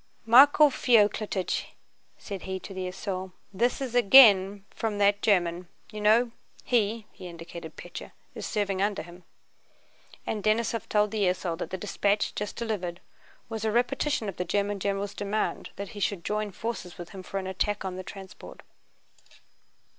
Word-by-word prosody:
"Michael 285 Hz, +5 st, +7 dB
Feoklítych," 210 Hz, -6 st, +2 dB, 0.5 s
said 200 Hz, -3 st, -7 dB
he 190 Hz, 0 st, -4 dB
to 195 Hz, -, -9 dB
the 185 Hz, -1 st, -4 dB
esaul, 185 Hz, 0 st, -5 dB, 0.2 s
"this 235 Hz, +6 st, +1 dB
is 260 Hz, -3 st, -4 dB
again 205 Hz, -5 st, +7 dB
fwom 220 Hz, -2 st, -2 dB
that 205 Hz, 0 st, +3 dB
German, 175 Hz, -3 st, +1 dB, 0.2 s
you 210 Hz, -1 st, -6 dB
know. 225 Hz, +3 st, +4 dB, 0.3 s
He"—he 215 Hz, -4 st, -1 dB
indicated 170 Hz, -1 st, -9 dB
Pétya—"is -, -, -10 dB
serving 200 Hz, -3 st, -1 dB
under 200 Hz, -5 st, 0 dB
him." 175 Hz, +1 st, -14 dB, 1.0 s
And 210 Hz, -2 st, -3 dB
Denísov 225 Hz, +1 st, 0 dB
told 210 Hz, -1 st, +2 dB
the 215 Hz, -2 st, +1 dB
esaul 180 Hz, -2 st, 0 dB
that -, -, -4 dB
the 190 Hz, -, -4 dB
dispatch 205 Hz, +1 st, 0 dB
just 210 Hz, 0 st, -4 dB
delivered 190 Hz, -7 st, -3 dB, 0.5 s
was 220 Hz, -1 st, -5 dB
a 220 Hz, -, +1 dB
repetition 245 Hz, +1 st, 0 dB
of 195 Hz, -, -5 dB
the -, -, -1 dB
German 200 Hz, +2 st, -1 dB
general's 200 Hz, +1 st, -2 dB
demand 205 Hz, +1 st, -2 dB
that 200 Hz, -1 st, -6 dB
he 205 Hz, -, -9 dB
should 195 Hz, -4 st, -2 dB
join 210 Hz, 0 st, -1 dB
forces 205 Hz, -3 st, -6 dB
with 175 Hz, -1 st, -8 dB
him 190 Hz, -, -8 dB
for 195 Hz, -, -6 dB
an 190 Hz, -, -3 dB
attack 195 Hz, +2 st, -2 dB
on 185 Hz, -1 st, -4 dB
the 185 Hz, -, -5 dB
transport. 190 Hz, 0 st, -11 dB
205 Hz, 155 wpm, -27 LUFS, 185-220 Hz, 1.0 s, Michael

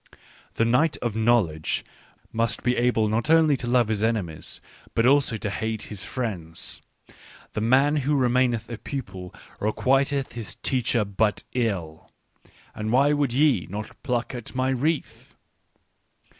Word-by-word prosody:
" -, -, -27 dB
The 115 Hz, -, +2 dB
knight 125 Hz, +7 st, +3 dB
of 115 Hz, -3 st, -3 dB
knowledge 110 Hz, -9 st, +1 dB, 0.5 s
must 115 Hz, 0 st, 0 dB
be 125 Hz, 0 st, +2 dB
able 120 Hz, -3 st, +2 dB
not 115 Hz, +7 st, -1 dB
only 160 Hz, -2 st, +5 dB
to 125 Hz, -, -5 dB
love 120 Hz, -2 st, +3 dB
his 105 Hz, -2 st, 0 dB
enemies, 105 Hz, -9 st, -2 dB, 0.4 s
but 115 Hz, -, +3 dB
also 135 Hz, -3 st, +4 dB
to 105 Hz, -1 st, -3 dB
hate 110 Hz, 0 st, -3 dB
his 95 Hz, -2 st, -6 dB
friends. 95 Hz, -8 st, -4 dB, 0.4 s
" -, -, -21 dB
The 105 Hz, -, -2 dB
man 135 Hz, +6 st, +4 dB
who 145 Hz, +1 st, +1 dB
remaineth 125 Hz, -3 st, +2 dB
a 115 Hz, -2 st, -7 dB
pupil 95 Hz, -10 st, -6 dB, 0.3 s
requiteth 135 Hz, +5 st, +1 dB
his 115 Hz, -3 st, -6 dB
teacher 120 Hz, -4 st, 0 dB
but 105 Hz, +1 st, 0 dB
ill. 95 Hz, -10 st, -2 dB, 0.6 s
And 110 Hz, 0 st, -3 dB
why 140 Hz, +4 st, +4 dB
would 145 Hz, -4 st, +1 dB
ye 130 Hz, -, +3 dB
not 105 Hz, +3 st, -7 dB
pluck 125 Hz, -2 st, -1 dB
at 120 Hz, 0 st, -7 dB
my 130 Hz, 0 st, +1 dB
wreath? 145 Hz, +4 st, -2 dB
120 Hz, 150 wpm, -25 LUFS, 110-130 Hz, 0.6 s, only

